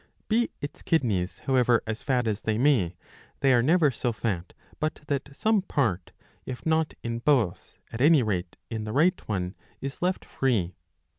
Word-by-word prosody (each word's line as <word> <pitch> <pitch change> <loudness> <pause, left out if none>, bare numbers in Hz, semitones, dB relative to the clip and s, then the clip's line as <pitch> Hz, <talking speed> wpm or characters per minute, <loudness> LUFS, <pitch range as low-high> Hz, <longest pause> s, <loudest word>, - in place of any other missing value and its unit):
Be 230 +2 +2
its 145 - -6
kidneys 105 - 0
however 125 -3 +3
as 110 0 -4
fat 125 -3 +1
as 110 -1 -1
they 110 -1 0
may, 115 - +3 0.5
they 135 -2 +5
are 120 - +5
never 155 +2 +4
so 125 -1 -1
fat 100 -6 -3 0.3
but 155 +1 -2
that 140 0 -1
some 215 +8 +2
part, 115 - -1 0.3
if 130 -1 -7
not 160 0 +1
in 115 0 -2
both 120 -8 +1
at 115 - -5
any 150 -1 +6
rate 95 -5 -2
.in 110 -1 -3
the 110 - -4
right 165 +7 +3
one, 90 -3 -2 0.3
is 135 +1 -6
left 180 +1 0
free.' 105 -10 0
125 Hz, 170 wpm, -27 LUFS, 110-150 Hz, 0.5 s, any